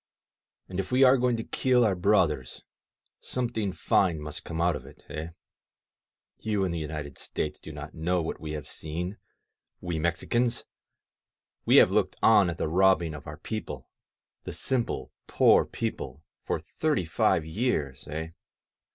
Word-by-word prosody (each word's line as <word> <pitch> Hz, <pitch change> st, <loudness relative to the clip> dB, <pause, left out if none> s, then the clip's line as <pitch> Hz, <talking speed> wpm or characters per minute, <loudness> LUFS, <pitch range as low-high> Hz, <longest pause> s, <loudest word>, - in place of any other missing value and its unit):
And, 95 Hz, 0 st, -5 dB
if 95 Hz, -, -3 dB
we 130 Hz, +2 st, +5 dB
are 130 Hz, 0 st, +8 dB
going 125 Hz, -2 st, +2 dB
to 115 Hz, -, -3 dB
kill 125 Hz, 0 st, +2 dB
our 105 Hz, -, +3 dB
brothers, 90 Hz, -9 st, +1 dB, 0.6 s
something 115 Hz, -5 st, -2 dB
fine 85 Hz, -1 st, +2 dB
must 75 Hz, 0 st, -7 dB
come 80 Hz, -1 st, -5 dB
out 85 Hz, -1 st, +3 dB
of -, -, -7 dB
it, -, -, -16 dB
eh? 80 Hz, +1 st, -4 dB, 1.1 s
You 105 Hz, -3 st, 0 dB
in 95 Hz, -, 0 dB
the 85 Hz, -, -2 dB
United 75 Hz, -3 st, -5 dB
States -, -, -4 dB
do 80 Hz, -, -9 dB
not 75 Hz, 0 st, -8 dB
know 90 Hz, +3 st, 0 dB
what 80 Hz, -, -3 dB
we 75 Hz, -1 st, -5 dB
have 75 Hz, -1 st, -6 dB
seen, 85 Hz, +6 st, -5 dB, 0.6 s
we 85 Hz, -3 st, -3 dB
Mexicans! 115 Hz, +9 st, 0 dB, 1.0 s
We -, -, +6 dB
have -, -, +8 dB
looked -, -, +1 dB
on 105 Hz, -5 st, +6 dB
at 85 Hz, -, -4 dB
the -, -, -1 dB
robbing 90 Hz, -1 st, +3 dB
of 75 Hz, -, -9 dB
our 75 Hz, 0 st, -7 dB
people, 110 Hz, +6 st, -6 dB, 0.5 s
the -, -, -6 dB
simple, 130 Hz, -3 st, -2 dB, 0.2 s
poor -, -, +5 dB
people, 70 Hz, +4 st, -5 dB, 0.2 s
for -, -, -1 dB
thirty 150 Hz, -, -1 dB
five 80 Hz, 0 st, +2 dB
years, 80 Hz, -, -2 dB
eh? 80 Hz, +2 st, -4 dB
85 Hz, 160 wpm, -28 LUFS, 80-110 Hz, 1.1 s, are